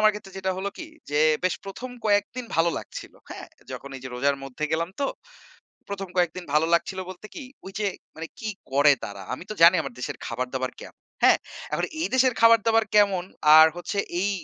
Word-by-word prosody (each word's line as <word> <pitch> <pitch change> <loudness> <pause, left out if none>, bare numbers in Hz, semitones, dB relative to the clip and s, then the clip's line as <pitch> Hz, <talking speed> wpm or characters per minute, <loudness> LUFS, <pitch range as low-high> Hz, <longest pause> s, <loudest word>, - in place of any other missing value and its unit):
আমার 215 0 +6
ক্ষেত্রে 200 -2 -10
যেটা 190 0 -1
হলো 195 +1 -2
কি? 335 - -6 0.2
যে, 145 - +1 0.3
বেশ 185 - +2
১ম 220 +6 -7
কয়েকদিন 205 +4 +1
ভালো 165 +1 +3
লাগছিল, - - -9 0.2
হ্যা? - - -7 0.3
যখন 140 - -7
এই - - -10
যে - - -5
রোজার 140 +3 +1
মধ্যে 135 +3 -5
গেলাম 165 +1 0
তো, 280 - +2 0.8
১ম 195 -1 -5
কয়েকদিন 175 0 0
ভালো 155 +2 +3
লাগছিল 185 +3 0
বলতে 185 +3 -10
কি? 300 - -7 0.2
ঐযে 195 +2 -3 0.3
মানে 160 +1 -6
কি 220 - -5 0.2
করে 145 +2 +6
তারা? 100 -1 -8
আমি 130 - -6
তো - - -3
জানি, 170 +2 +9
আমার - - -7
দেশের 125 - -4
খাবার 125 +2 -3
দাবার 130 0 -2
কেমন? - - -12 0.3
হ্যা? - - +8 0.4
এখন - - 0 0.2
এই 330 - +1
দেশের 260 -1 +4
খাবার 230 0 +7
দাবার 225 0 +4
কেমন? 200 -4 +4 0.3
আর 160 - +10
হচ্ছে 175 +3 -4 0.2
এই 200 +2 +1
185 Hz, 200 wpm, -25 LUFS, 150-210 Hz, 0.8 s, আর